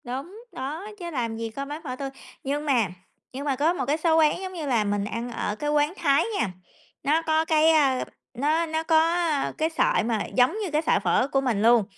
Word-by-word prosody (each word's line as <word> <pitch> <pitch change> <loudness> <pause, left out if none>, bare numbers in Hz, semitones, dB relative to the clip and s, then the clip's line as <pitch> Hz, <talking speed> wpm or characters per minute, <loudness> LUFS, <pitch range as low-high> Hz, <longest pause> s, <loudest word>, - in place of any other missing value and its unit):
Đúng, 290 - -7
đó, 295 +8 -5
chứ 345 -1 -5
làm 230 -6 -2
gì 225 0 -4
có 275 +5 -5
bán 295 +3 -6
phở 255 -5 -4
tươi 275 +1 -4 0.3
nhưng 290 +2 -2
mà 250 -8 +2 0.5
nhưng 275 +3 -5
mà 280 -2 +1
có 305 +6 +2
một 270 -8 -2
cái 290 +4 +1
số 320 0 +2
quán, 310 +3 +3
giống 375 -1 -6
như 330 -4 -5
là, 240 -6 +2
mình 205 -1 -1
ăn 230 +3 -4
ở 210 -2 -3
cái 295 +7 -3
quán 295 +2 +2
Thái 280 -4 +3 0.2
nha, 195 - 0 0.5
nó 305 +4 +2
có 315 0 +1
cái, 315 0 +4
ơ, 275 -5 +3 0.3
nó 300 +6 +1
nó 320 0 -2
có, 325 -1 +4 0.2
ơ, 325 -5 0
cái 315 +1 +1
sợi - - +2
mà 225 -3 -1
giống 250 +7 +2
như 355 - -5
cái 300 +1 +2
sợi - - +2
phở 255 - +2
của 270 - +2
mình 240 -6 0
luôn, 230 0 +5
290 Hz, 235 wpm, -25 LUFS, 250-320 Hz, 0.5 s, luôn